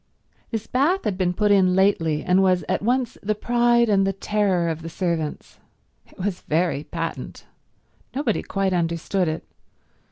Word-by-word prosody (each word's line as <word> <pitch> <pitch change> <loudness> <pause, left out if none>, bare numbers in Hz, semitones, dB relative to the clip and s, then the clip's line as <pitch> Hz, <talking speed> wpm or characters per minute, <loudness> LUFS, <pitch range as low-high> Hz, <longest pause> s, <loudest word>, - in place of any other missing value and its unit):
This 225 -2 -3
bath 315 +10 +1
had 205 - -1
been 180 -1 +1
put 210 +3 +1
in 185 -2 +4
lately, 165 -6 +2
and 185 +1 +3
was 185 -2 +2
at 185 - 0
once 245 +2 0
the 215 +1 -1
pride 240 +1 +3
and 195 -2 +3
the 195 - 0
terror 195 -3 0
of 165 -1 -3
the 165 - -6
servants. 165 -3 -3 0.5
It - - -22
was 185 -1 -3
very 160 -2 0
patent. 165 -1 -5 0.7
Nobody 265 -6 0
quite 195 -1 -1
understood 170 +2 0
it. 155 0 -3
190 Hz, 160 wpm, -23 LUFS, 170-210 Hz, 0.7 s, in